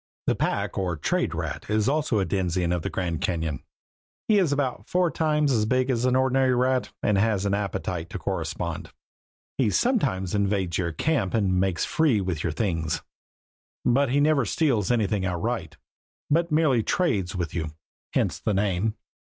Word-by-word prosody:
The - - +3
pack - - -1
or 90 -3 -1
trade - - 0
rat - - -4
is 105 0 +2
also 145 -4 +1
a 95 - +1
denizen 90 -1 0
of 90 -1 0
the - - -3
Grand 85 -4 -2
Cañon. 80 -4 -1 0.7
He 215 -2 +5
is 175 -7 +2
about 140 -3 -2
four 180 -2 +2
times 150 -2 +1
as 110 -4 +2
big 130 +2 +2
as 120 0 0
an 130 0 +3
ordinary 130 0 +3
rat 130 +1 +1
and 105 -2 +3
has 100 -2 +1
an 100 - +1
appetite 95 -4 -2
to - - -5
correspond. - - -3 0.7
He 125 -5 +3
sometimes 115 - +1
invades 100 -4 0
your 85 -2 -1
camp 120 - 0
and 95 -4 +2
makes 95 -2 +1
free 155 -10 +2
with 90 -5 -2
your 85 - 0
things, 80 -5 -1 0.8
but 135 +2 +3
he 140 +3 +2
never 145 -2 +3
steals 115 - +1
anything 105 -4 +1
outright 95 0 -2 0.6
he 170 - +4
merely 150 -6 +3
trades 105 - 0
with 85 -4 -3
you; 80 -1 -2 0.5
hence - - 0
his 105 - +1
name. 100 +2 0
105 Hz, 170 wpm, -25 LUFS, 90-130 Hz, 0.8 s, He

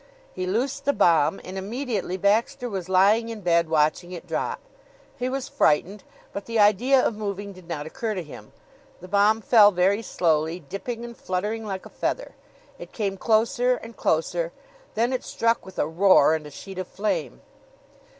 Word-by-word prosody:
He 185 0 -4
loosed 265 +8 -1
the 285 - +3
bomb 165 - +3
and 190 +1 -6
immediately 215 -3 -3
Baxter 215 +5 +1
was 190 -5 -5
lying 205 +5 +4
in 225 -2 -6
bed 170 -2 +2
watching 155 +3 +1
it 175 - -8
drop. - - -3 0.6
He 250 +1 -1
was 270 0 -3
frightened, 185 +7 +1 0.3
but 200 - -5
the 230 -1 -2
idea 215 +6 +4
of 245 - +1
moving 200 -1 -5
did 185 -2 -15
not 155 -4 -4
occur 220 +6 -4
to 180 - -3
him. 150 - -12 0.5
The 185 - -11
bomb 205 +3 +3
fell 215 -1 +7
very 195 +2 +2
slowly, 160 -4 0
dipping 225 - -6
and 235 0 -9
fluttering 210 +4 -3
like 190 -2 -5
a - - -10
feather. - - -3 0.5
It - - -10
came 200 -3 -2
closer 240 +5 +2
and 230 -1 -10
closer. 165 +1 0 0.4
Then 235 +4 +1
it 255 - -2
struck 230 0 0
with 190 - -12
a - - +1
roar 165 -2 +5
and 155 -2 -3
a - - -9
sheet 190 +6 -9
of 185 - -4
flame. 210 +3 -3
200 Hz, 180 wpm, -24 LUFS, 180-230 Hz, 0.6 s, fell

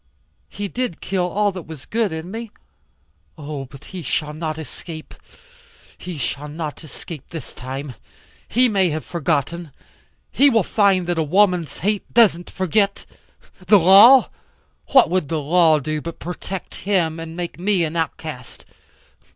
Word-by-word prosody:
He 205 - -5
did 245 -5 -3
kill 185 -2 -1
all 205 +2 +1
that 185 -4 -9
was 155 -4 -10
good 225 -2 0
in 160 +3 -6
me. 225 +1 -6 0.9
Oh, 145 -2 -6
but 135 +2 -14
he 185 - -5
shall 150 0 -2
not 155 0 -4
escape. 160 0 -9 0.8
He 180 -3 -7
shall 140 +2 -3
not 155 +1 -6
escape 155 -1 -10
this 160 -7 -8
time. 130 +2 -6 0.5
He 250 +3 +3
may 195 -5 +2
have 155 0 -4
forgotten. 170 0 -2 0.6
He 285 +1 +5
will 225 -6 +3
find 195 -2 +2
that 175 -1 -1
a - - +2
woman's 180 -2 +2
hate 210 -1 -1
doesn't 200 -7 +4
forget. 200 +2 0 0.6
The 205 - +7
law? 200 +9 +8 0.6
What 265 - +5
would 180 -6 0
the 160 - -1
law 160 +1 +4
do 155 +1 -3
but 170 +1 -7
protect 180 +2 -6 0.2
him 165 -5 +1
and 165 0 -7
make 175 -1 -5
me 190 -1 +1
an 160 0 -3
outcast? 155 -5 -5
170 Hz, 150 wpm, -21 LUFS, 155-195 Hz, 0.9 s, law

